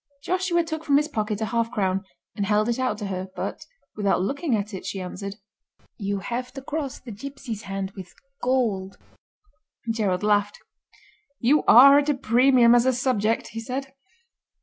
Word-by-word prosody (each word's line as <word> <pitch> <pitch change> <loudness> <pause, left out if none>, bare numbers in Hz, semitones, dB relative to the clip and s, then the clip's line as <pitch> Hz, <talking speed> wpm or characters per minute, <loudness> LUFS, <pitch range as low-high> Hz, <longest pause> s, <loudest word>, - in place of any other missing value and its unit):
Joshua 365 -2 +1
took 320 -1 -5
from 285 -3 +3
his 300 +1 +1
pocket 215 -6 -3
a - - +1
half 230 +1 0
crown 195 -4 -1 0.3
and 200 -2 -2
held 210 +1 +2
it 235 +1 -1
out 255 -5 0
to 210 - -5
her, 190 -1 -4
but, - - -5 0.3
without 200 -3 +1
looking 275 - -1
at 210 0 -3
it, 190 - -6
she 190 0 -4
answered: 195 +2 -6 0.6
"You 200 -1 -2
have 245 +5 -4
to 270 - -7
cross 285 -2 -4
the 245 - -10
gipsy's 235 -1 -7
hand 195 -1 -4
with 190 -2 -11 0.3
gold." 220 -7 0 0.9
Gerald 210 -5 0
laughed. 205 -1 +2 0.8
"You 275 +5 +3
are 275 +4 +9
at 290 +1 -1
a 295 - +2
premium 245 -1 +4
as 240 +1 +4
a 260 - +4
subject," 230 -3 0
he 225 - -6
said. 265 +4 -5
230 Hz, 170 wpm, -24 LUFS, 200-270 Hz, 0.9 s, are